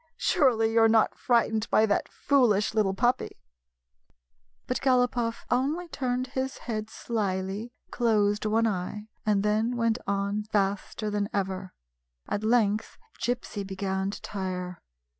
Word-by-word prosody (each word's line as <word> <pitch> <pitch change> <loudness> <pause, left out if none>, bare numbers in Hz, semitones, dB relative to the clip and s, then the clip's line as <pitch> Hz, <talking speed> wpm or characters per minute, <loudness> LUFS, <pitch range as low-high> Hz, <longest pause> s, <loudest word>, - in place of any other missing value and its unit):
Surely 225 -7 +3
you 230 - +5
're 225 - +7
not 220 -1 +4
frightened 225 -3 +1
by 220 - +5
that 205 -2 0
foolish 235 -8 +2
little 205 -3 +1
puppy! 245 +5 0 0.6
" - - -45
But - - -2
Galopoff 245 -3 +1
only 290 +8 0
turned 255 -3 -1
his 265 0 -3
head 215 -2 -4
slyly, 200 0 -3 0.2
closed 215 -3 +2
one 225 +2 +2
eye, 210 +1 -3 0.2
and 205 -2 +3
then 220 +3 +1
went 230 0 +1
on 200 +1 -1
faster 205 +1 -1
than 205 0 -1
ever. 190 -1 -3 0.5
At 205 - -2
length 215 -2 +1 0.2
Gypsy 235 -4 -2
began 190 0 -2
to 200 - -6
tire. 180 -2 -4
215 Hz, 135 wpm, -27 LUFS, 195-235 Hz, 0.6 s, re